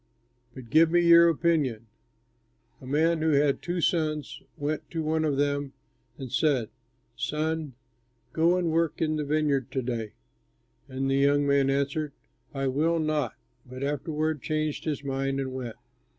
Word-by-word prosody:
"But 125 -4 -11
give 160 +2 +6
me 175 +1 +3
your 170 0 +7
opinion. 150 -9 0 1.0
A 130 - -10
man 160 +4 +2
who 160 -1 +2
had 140 0 +2
two 175 0 -2
sons 155 -3 -1 0.2
went 145 +1 -3
to 165 -2 -3
one 160 +1 0
of 145 -3 0
them 145 -1 0 0.4
and 130 -3 -7
said, 135 -5 +1 0.5
'Son, 155 +2 -2 0.6
go 170 +3 +3
and 175 -3 0
work 165 -1 0
in 155 -1 0
the 150 - -1
vineyard 145 -3 0
to 130 - -2
day.' 115 -3 -4 0.8
And 135 +1 -2
the 135 0 +2
young 145 +1 +3
man 140 -1 +3
answered, 140 +2 -1 0.4
'I 135 -2 -2
will 160 +5 +1
not'; 155 -6 -1 0.3
but 130 +1 -8
afterward 150 +1 -2
changed 155 -1 -2
his 150 -3 -2
mind 135 0 -2
and 130 -1 -3
went. 125 -4 -5
145 Hz, 155 wpm, -27 LUFS, 135-160 Hz, 1.0 s, your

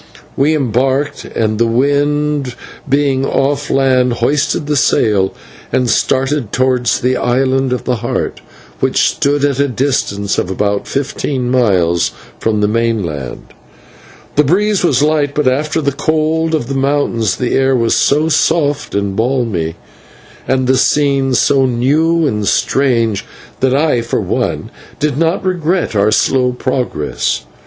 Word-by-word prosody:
We 150 +3 +2
embarked, 135 +1 -1
and, 110 -1 -2
the 115 - +3
wind 145 +2 0 0.3
being 140 -1 +1
off 140 +1 0
land, 130 -2 +2
hoisted 145 +5 0
the 150 0 -1
sail 105 -6 +2 0.4
and 125 -1 +1
started 135 -3 0
towards 125 -1 +1
the 130 +1 +1
Island 130 +1 +1
of 125 - -2
the 125 -2 -1
Heart, 120 +2 -3 0.4
which - - +2
stood 145 0 0
at 140 -2 -1
a 140 - +2
distance 115 -6 -1
of - - -2
about 100 +1 -1
fifteen 135 -2 -2
miles 90 -9 +2 0.3
from 110 -2 0
the 105 - +2
mainland. 105 - -2 0.9
The 150 - +6
breeze 200 +7 +1
was 145 -5 +2
light, 150 -2 +1
but 150 -3 +1
after 150 +5 0
the 140 -1 0
cold 155 +2 0
of 150 - -2
the 135 - -4
mountains 135 -7 0
the 125 - -2
air 135 0 +2
was 115 -2 +1
so 150 +3 +2
soft 150 -4 0
and 100 -1 -1
balmy, 110 -9 -1 0.7
and 130 -1 +1
the 130 +1 +2
scene 140 -2 +2
so 135 +1 +3
new 155 +7 +1
and 105 -7 -1
strange, 115 -6 +1 0.4
that 130 0 +2
I, 145 -4 +2
for 115 - -2
one, - - -2 0.3
did 150 -2 0
not 165 +5 0
regret 180 - -1
our 100 +1 +3
slow 125 +3 +2
progress. 125 - -2
130 Hz, 145 wpm, -15 LUFS, 115-145 Hz, 0.9 s, The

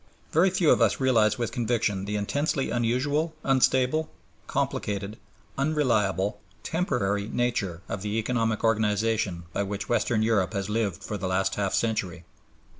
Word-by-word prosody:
Very 170 +5 +4
few 180 -4 +3
of - - +4
us - - +3
realize 115 -5 +3
with 120 -2 -2
conviction 110 -5 0
the 105 +1 -3
intensely 135 +7 -1
unusual, 140 +7 0
unstable, 130 +3 +2 0.4
complicated, 100 +1 -2 0.4
unreliable, 110 - +1 0.2
temporary 110 - -1
nature 105 -8 -1
of 100 - -4
the 105 +2 -2
economic 115 -1 0
organization 105 -4 +1
by - - 0
which 100 0 -4
Western 115 -2 +1
Europe 105 -5 +1
has 100 -1 -2
lived 105 -5 -1
for 105 - -4
the 95 - -2
last 95 +1 +1
half 100 -2 0
century. 95 -7 -1
110 Hz, 140 wpm, -26 LUFS, 100-125 Hz, 0.4 s, Very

